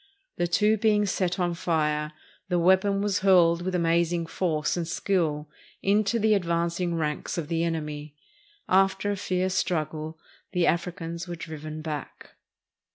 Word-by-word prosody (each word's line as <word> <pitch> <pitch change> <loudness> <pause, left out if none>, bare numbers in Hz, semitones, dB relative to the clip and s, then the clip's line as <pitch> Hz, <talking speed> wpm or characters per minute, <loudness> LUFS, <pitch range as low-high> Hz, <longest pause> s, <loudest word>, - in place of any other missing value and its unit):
The 175 - +1
two 210 +5 +3
being 210 -1 +3
set 185 -2 -1
on 175 -1 +1
fire, 150 -3 -1 0.4
the 180 - +2
weapon 190 +3 +3
was 205 -1 +1
hurled 175 -3 +5
with 185 +1 -2
amazing 170 0 +1
force 160 -3 -1
and 170 -2 -2
skill 160 -5 0 0.4
into 205 +2 +2
the 220 -1 +2
advanc 170 -3 0
ing 175 -2 0
ranks 150 0 -2
of 160 -3 -3
the 165 0 0
enemy. 150 -3 -4 0.5
After 195 +2 +2
a - - -1
fierce 185 -1 -1
struggle 155 -3 -2 0.4
the 180 -2 +2
Afri 170 +1 +1
cans 170 0 -5
were 175 - -4
driven 155 -1 -7
back. 150 -3 -6
170 Hz, 155 wpm, -26 LUFS, 160-190 Hz, 0.5 s, hurled